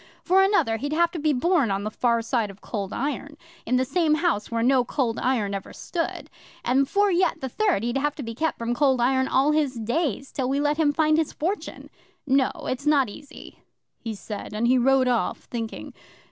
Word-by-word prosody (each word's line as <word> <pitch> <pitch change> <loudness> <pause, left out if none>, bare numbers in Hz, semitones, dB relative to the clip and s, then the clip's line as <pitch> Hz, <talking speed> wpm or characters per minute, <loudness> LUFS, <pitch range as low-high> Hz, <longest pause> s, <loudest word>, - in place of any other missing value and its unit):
For 375 +2 +4
another, 385 - +2
he'd 285 +6 -3
have 340 +1 +2
to 340 - -5
be 305 0 +2
born 290 - +2
on 195 0 -1
the 215 - -3
far 235 0 +1
side 230 -3 0
of 195 0 -12
Cold 200 -3 -5
Iron 290 +2 -4 0.3
in 255 +2 +2
some 320 +1 +2
house 315 - 0
where 230 0 -1
no 255 0 +4
Cold 245 -2 -1
Iron 225 -6 0
ever 195 -1 -6
stood; 335 -2 -4 0.4
and 270 +2 +2
for 405 0 +3
yet 360 +1 +1
the 265 - -4
third, 395 - +1
he'd 240 +3 0
have 295 +1 -1
to 285 - -6
be 230 -1 -5
kept 315 +7 -1
from 235 +1 -2
Cold 265 0 +2
Iron 260 +2 +2
all 275 +3 +3
his 300 -4 +1
days 250 - -2
till 260 -2 -2
we 275 +1 0
let 295 +1 +1
him 310 -3 +3
find 310 +1 +2
his 320 - -1
fortune. 370 +7 -4 0.3
No, 270 -1 +3
it's 270 +3 -3
not 280 -5 +4
easy," 285 +7 -12 0.4
he 225 -2 -5
said, 205 0 -7
and 225 +2 +1
he 255 +1 +4
rode 265 +1 +3
off, 245 -2 0
thinking. 230 -2 -6
265 Hz, 210 wpm, -25 LUFS, 235-305 Hz, 0.4 s, For